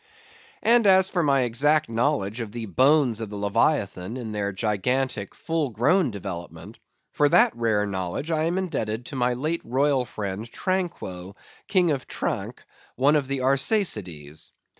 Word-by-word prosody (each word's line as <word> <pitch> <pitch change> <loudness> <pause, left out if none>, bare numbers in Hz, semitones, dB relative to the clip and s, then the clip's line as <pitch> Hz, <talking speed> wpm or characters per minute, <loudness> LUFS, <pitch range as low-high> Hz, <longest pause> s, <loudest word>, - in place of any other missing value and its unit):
And 235 -2 +4
as 190 0 +5
for 180 - +1
my 140 -4 +3
exact 140 +6 +2
knowledge 115 -2 -1
of 110 -3 -6
the 115 0 -5
bones 130 - +3
of 110 - -4
the 105 - -7
leviathan 100 -1 0
in 115 -4 -6
their 100 -1 -2
gigantic, 105 +2 -1
full 160 -3 -2
grown 145 - +2
development, 90 -1 -8 0.3
for 145 0 +2
that - - +4
rare 110 -3 +1
knowledge 95 - -4
I 155 0 +1
am 170 +2 0
indebted 125 - -3
to 140 - -7
my 125 -1 +1
late 155 +6 -2
royal 135 +1 +1
friend 105 0 -5
Tranquo, 135 - -3 0.3
king 180 -5 +3
of 135 -3 -3
Tranque, - - -4 0.3
one 140 +4 +3
of 145 -3 +1
the 135 -1 -2
Arsacides. 105 - 0
125 Hz, 155 wpm, -25 LUFS, 105-150 Hz, 0.3 s, as